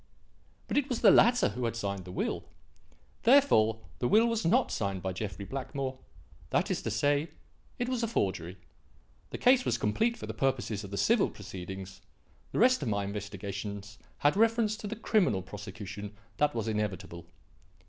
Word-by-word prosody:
But - - -1
it 285 - -4
was 245 -3 -2
the 205 - +8
latter 245 0 +5
who 120 +4 -3
had 115 - -1
signed 100 -4 -3
the 90 - -8
will. - - -2 0.8
Therefore 170 - +5 0.2
the 120 - +1
will 220 - +5
was 230 -1 0
not 165 - +3
signed 100 -3 -2
by 95 -1 -2
Jeffrey 100 -1 -5
Blackmore; 135 +1 -4 0.5
that - - +1
is - - -1
to - - -3
say, 145 +2 +1 0.5
it 245 - -1
was 255 -2 -1
a 230 - +1
forgery. 95 - -2 0.7
The - - -5
case 250 0 +5
was - - 0
complete 225 - +1
for - - -7
the - - -5
purposes 125 -6 -1
of 100 - -8
the 100 - -5
civil 225 - +3
proceedings; 95 0 -8 0.5
the - - -3
rest 255 -1 +5
of 130 - -1
my 100 -1 0
investigations 100 0 -6 0.2
had 145 +3 +3
reference 225 0 +3
to 210 - -6
the 220 - -4
criminal 210 - +1
prosecution 100 +1 -8 0.2
that 150 -2 +2
was 115 -1 -2
inevitable. 100 -6 -3
110 Hz, 175 wpm, -30 LUFS, -, 0.8 s, the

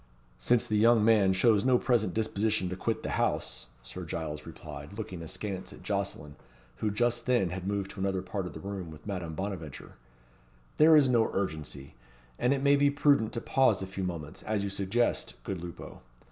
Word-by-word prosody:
"Since 115 - +2
the 105 - 0
young 115 -1 +5
man 105 -4 +5
shows 100 +2 +3
no 130 -1 +4
present 115 -8 +1
disposition 110 -3 0
to 90 - -3
quit - - -2
the - - -3
house," - - -1 0.2
Sir - - -8
Giles 75 -2 -5
replied, 75 +5 -9
looking 95 -6 -6
askance 95 +3 -5
at - - -13
Jocelyn, 75 0 -3 0.4
who 110 - 0
just 120 +3 0
then 120 -9 +2
had 95 +1 -5
moved 100 -1 -2
to - - -10
another 95 -1 -1
part 95 -2 -4
of - - -9
the - - -8
room 95 -3 -5
with 75 -1 -12
Madame 90 -6 -4
Bonaventure, 95 -10 -6 0.8
"there 155 +1 +7
is 145 -3 +5
no 120 -3 +3
urgency; 75 -7 -4 0.5
and 125 - +2
it 140 -1 +1
may 140 0 +6
be 145 0 +4
prudent 140 -5 +3
to 115 - -3
pause 130 -8 +2
a - - -2
few 95 0 -5
moments, 85 -5 -5
as 105 -2 -1
you 100 - -3
suggest, 100 +5 0
good 95 -4 -4
Lupo. 85 -2 -9
100 Hz, 190 wpm, -29 LUFS, 90-115 Hz, 0.8 s, there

